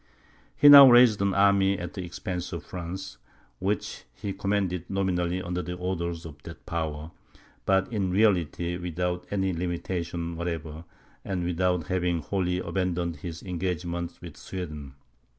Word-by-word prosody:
He 145 - +6
now 140 -2 +12
raised 120 -4 +6
an 100 -1 +1
army 100 0 +4
at 85 -1 -6
the 95 - -5
expense 90 0 -5
of 85 - -5
France, 95 +2 -7 0.4
which 100 +2 -3
he 100 - -5
commanded 95 -3 -1
nominally 90 -2 0
under 90 +1 -2
the 90 0 -5
orders 85 -2 -3
of 75 -3 -10
that - - -11
power, 80 -1 -4 0.6
but 95 +4 +2
in 100 -4 0
reality 90 -4 +1
without 90 0 -3
any 95 -2 0
limitation 85 -1 -3
whatever, 80 -1 -5 0.4
and 90 -3 -3
without 90 0 0
having 90 -3 -1
wholly 90 0 -1
abandoned 90 -2 -2
his 85 -3 -7
engagements 85 -1 -3
with 85 -4 -10
Sweden. 75 -7 -7
90 Hz, 140 wpm, -27 LUFS, 85-95 Hz, 0.6 s, now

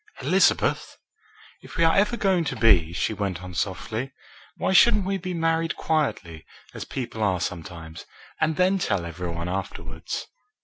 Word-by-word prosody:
"Elizabeth!" - - +2 0.6
"If - - -11
we 165 - +3
are 165 - +4
ever 210 +4 +2
going 190 -5 +2
to - - -2
be," 90 -8 +4
she 90 - -1
went 95 -3 -3
on 90 -1 -8
softly, 110 +8 -3 0.5
"why - - 0
shouldn't 210 +1 +6
we 195 0 -1
be 180 0 -4
married 165 0 0
quietly, 95 - -1 0.3
as - - -6
people 120 -4 -5
are 95 -4 +2
sometimes, 80 -1 -6 0.3
and 155 0 +1
then 185 +3 +3
tell 95 - 0
every 85 +1 -5
one 85 +1 -4
afterwards?" 85 -3 -5
110 Hz, 160 wpm, -25 LUFS, -, 0.6 s, shouldn't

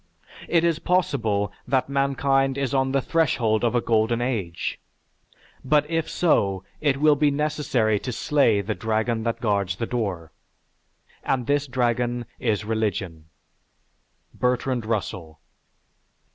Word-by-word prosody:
It 170 -1 +3
is 165 -2 +1
possible 115 - 0 0.2
that 130 0 +1
mankind 135 0 +1
is 140 -2 -1
on 135 -1 +1
the 135 -1 +1
threshold 120 -9 +1
of 120 0 +1
a 120 - +3
golden 115 +1 +1
age, 110 -9 -3 0.8
but 150 +2 +2
if 165 -1 0
so, 100 - +1 0.2
it 145 -3 +1
will 150 +1 +4
be 150 +1 +3
necessary 140 -7 0
to 125 - -5
slay 120 -5 +2
the 105 +2 -2
dragon 110 +1 -1
that 115 - -1
guards 100 -5 0
the 115 - -3
door, 95 -10 -3 0.9
and 125 -3 0
this 145 +1 +1
dragon 120 -1 0
is 110 -3 0
religion." 100 -7 -2 1.1
(_Bertrand 125 -2 0
Russell. 90 -7 -3
120 Hz, 130 wpm, -24 LUFS, 110-140 Hz, 1.1 s, will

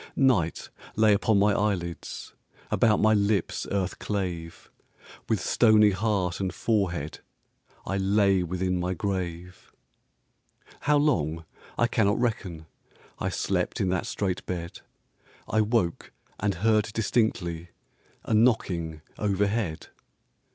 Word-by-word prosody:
Night 115 -12 +1 0.2
lay 110 -1 +5
upon 105 +1 +2
my 100 +1 +4
eyelids, 95 -5 -3 0.4
About 110 -3 +3
my 110 0 +4
lips 100 0 0
earth 95 -2 -2
clave; 90 -5 -4 0.6
With - - +2
stony 110 -3 +5
heart 95 -3 -1
and 95 -2 -1
forehead 90 -7 -1 0.7
I 95 - -1
lay 100 -1 +3
within 90 +1 -1
my 90 +1 -1
grave. 90 -1 -4 1.1
How 150 0 +3
long 85 - +1 0.3
I 120 - +3
cannot 105 -2 +1
reckon, 100 -9 -2 0.5
I - - -1
slept - - -1
in 95 - +1
that 90 -1 -1
strait 95 -3 -2
bed; 85 -1 -5 0.7
I 110 - +2
woke 105 -6 0 0.3
and 100 -1 0
heard 105 +3 +2
distinctly 100 -7 0 0.5
A - - -2
knocking 90 -9 +1 0.2
overhead. 100 -3 -1
100 Hz, 115 wpm, -27 LUFS, 90-110 Hz, 1.1 s, lay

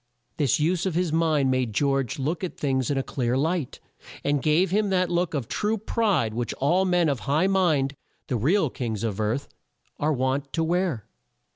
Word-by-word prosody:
This 145 -3 +2
use 175 +4 +1
of 180 - -2
his 175 -3 0
mind 155 -5 +2
made 130 -4 0
George 135 -2 +1
look 155 +6 -2
at 185 - -4
things 130 -3 0
in 145 - 0
a 135 - 0
clear 125 -2 -1
light, 160 0 -1 0.4
and 145 -1 +1
gave 165 +5 +2
him 205 +1 +2
that 185 -2 +1
look 175 -2 0
of 130 -6 -2
true 215 +1 -1
pride 200 - 0
which 120 -1 -3
all 175 +8 +2
men 180 -2 +2
of 140 -4 0
high 155 +6 +3
mind, 165 -8 +2 0.3
the 125 - -2
real 150 - +2
kings 115 -4 -4
of 110 -3 -2
earth, 115 +7 -1 0.5
are 150 +2 +1
wont 135 0 -1
to 165 - +1
wear. 170 - 0
150 Hz, 190 wpm, -25 LUFS, 130-180 Hz, 0.5 s, high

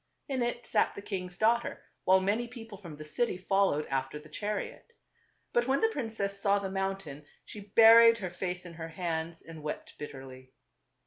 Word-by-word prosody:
In 265 -2 -1
it 240 0 -2
sat - - +2
^ - - -21
the - - -6
king's 185 -3 -5
daughter, 235 +2 +1 0.2
while 190 +1 +6
many 215 +5 0
people 225 -4 -10
from 170 -6 -9
the 155 - -9
city 230 +6 -1
followed 190 -5 +2
after 135 +1 -2
the 150 +1 -13
chariot. 210 - -4 0.6
But 240 0 +2
when 270 +1 +2
the 450 - +3
princess 220 - -3
saw 200 0 +3
the 195 -1 -3
mountain 195 -7 -3 0.2
she 210 - -9 0.2
buried 230 0 +9
her 185 -5 -5
face 180 0 -4
in 175 - -9
her 165 0 -7
hands 165 -1 -3
and 165 -1 -10
wept 150 0 -5
bitterly. 130 -2 -9
195 Hz, 185 wpm, -30 LUFS, 160-225 Hz, 0.6 s, buried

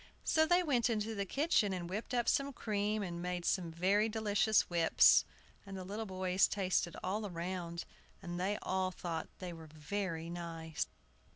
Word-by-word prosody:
So 315 0 +3
they 355 +1 +4
went 250 -7 +2
into 220 -1 -1
the 200 -2 -3
kitchen, 275 - +2
and 175 -2 -4
whipped 205 +7 -4
up 240 -1 +2
the 275 +3 +2
cream, 210 -2 -1
and 175 -2 -4
made 180 -1 -3
some 175 -3 0
very 195 +6 +2
delicious 215 -1 +3
whips; 170 -2 +5 0.4
and 195 -1 -8
the 185 - -5
little 210 +4 -5
boys 185 0 +2
tasted 185 -3 0
all 205 +3 -2
round, 170 -1 -4 0.3
and 175 0 -5
they 200 +3 0
all 185 0 0
thought 170 -3 -4
they 180 -2 -6
were 165 -1 -10
very 165 +2 -4
nice. 165 -2 -4
190 Hz, 170 wpm, -35 LUFS, 175-210 Hz, 0.4 s, whips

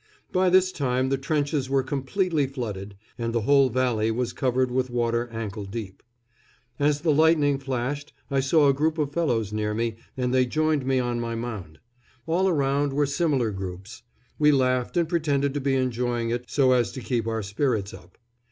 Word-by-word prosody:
By 185 0 +3
this 185 +1 +4
time 130 -4 0
the 135 - +1
trenches 145 -1 -1
were 135 -1 +2
completely 145 +3 0
flooded, 105 -7 -6 0.2
and 115 0 -2
the 115 - +1
whole 140 +3 +4
valley 120 -3 +1
was 120 +2 -1
covered 130 -1 0
with 130 0 0
water 120 0 0
ankle 110 -2 -5
deep. 100 -1 -7 0.8
As 145 0 +2
the 160 -2 +2
lightning 150 -2 +3
flashed 135 +2 -3 0.2
I 135 - +2
saw 145 +3 +4
a 140 - +5
group 155 +4 0
of 145 -2 -1
fellows 115 - 0
near 105 0 -1
me, 115 0 -2 0.2
and 125 -1 -1
they 130 -1 +3
joined 155 0 0
me 135 -1 +2
on 120 -1 -1
my 115 -1 -3
mound. 110 -9 -6 0.5
All 180 +4 +2
around 140 -3 +1
were 145 +1 +2
similar 140 -5 0
groups. 95 +3 -7 0.4
We 150 0 +5
laughed 130 +1 +1
and 170 -2 +2
pretended 145 -5 0
to 145 - -2
be 135 0 +1
enjoying 120 -2 -1
it, 120 +1 -2
so 135 -3 +3
as 120 -2 +2
to 130 - -6
keep 115 -3 -1
our 115 -1 -2
spirits 105 0 -1
up. - - -14
130 Hz, 185 wpm, -25 LUFS, 115-145 Hz, 0.8 s, a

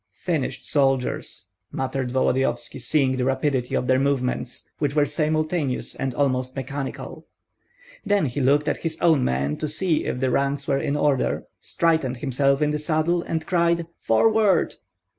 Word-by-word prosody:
"Finished 140 -7 -2
soldiers!" 135 -8 0 0.2
muttered 130 -1 -2
Volodyovski, 130 -1 0
seeing 130 0 +1
the 125 - 0
rapidity 130 -1 0
of - - 0
their 130 +1 +3
movements, 130 -3 -1
which 145 -1 -1
were 150 -1 +4
simultaneous 155 -1 -1
and 135 -2 -3
almost 130 -2 0
mechanical. 135 +1 -6 0.8
Then 205 -4 +2
he 135 +1 -2
looked 145 +3 +3
at - - +1
his 160 -1 -4
own 160 -6 +4
men 70 +3 0
to 155 - -3
see 160 +2 0
if - - -2
the 130 0 +1
ranks 140 +2 0
were 135 -1 +1
in 140 +1 -1
order, 145 -3 +1 0.2
straightened 160 -7 0
himself 140 +2 +1
in 150 - +1
the 150 - -1
saddle, 155 +3 +1
and 160 -1 -3
cried, 170 -1 +1
"Forward!" 205 - +3
140 Hz, 155 wpm, -24 LUFS, 130-155 Hz, 0.8 s, were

